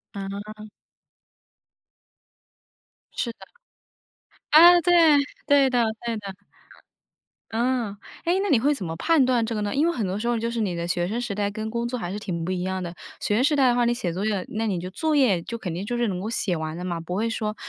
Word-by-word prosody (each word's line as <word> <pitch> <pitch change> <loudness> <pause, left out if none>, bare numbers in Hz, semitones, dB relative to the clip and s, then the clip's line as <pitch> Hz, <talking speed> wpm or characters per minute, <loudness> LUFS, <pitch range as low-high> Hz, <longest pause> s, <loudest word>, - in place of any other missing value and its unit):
嗯。 205 +2 -7 2.4
是 235 - -2
的。 - - -51 1.1
啊， 345 +3 +8
对， 355 - +2 0.6
对 280 -2 +5
的 245 -2 +2 0.2
对 230 -1 -1
的。 200 -2 -7 1.2
嗯。 235 -3 -1 0.3
哎， 345 - +1
那 405 - -1
你 250 - +4
会 290 +5 +2
怎 195 -10 -5
么 160 0 -4
判 315 - +3
断 245 -3 +2
这 230 - -3
个 210 - -2
呢？ 205 +3 -2
因 305 +4 +3
为 340 - +1
很 220 -9 -2
多 190 +2 -2
时 235 +3 -3
候 240 -1 +1
就 230 +1 -2
是 230 -1 -2
你 190 -4 -1
的 170 0 -3
学 175 0 0
生 225 +4 -2
时 230 -5 -3
代 205 -1 0
跟 220 0 -5
工 235 +1 -2
作 250 +1 -3
还 175 -4 -4
是 205 - -4
挺 170 -5 -4
不 185 - -2
一 180 -1 -2
样 190 0 -2
的。 170 0 -6 0.3
学 205 - 0
生 250 - +2
时 295 +1 +3
代 270 -2 +4
的 240 - +3
话， 245 - +2
你 240 - +2
写 180 -8 -3
作 195 +4 -3
业， 200 -4 -1
那 225 +1 -2
你 185 -4 -1
就 180 +1 -6
作 310 - -1
业 215 -11 +3
就 230 - -5
肯 180 -7 -5
定 185 +4 -4
就 240 +2 -2
是 240 -1 +1
能 180 -2 -2
够 210 +4 -4
写 195 -6 0
完 160 0 -4
的 180 - -6
嘛， 170 -2 -3
不 175 +2 -5
会 225 +3 0
说 215 -1 -3
215 Hz, 250 characters per minute, -24 LUFS, 190-245 Hz, 2.4 s, 啊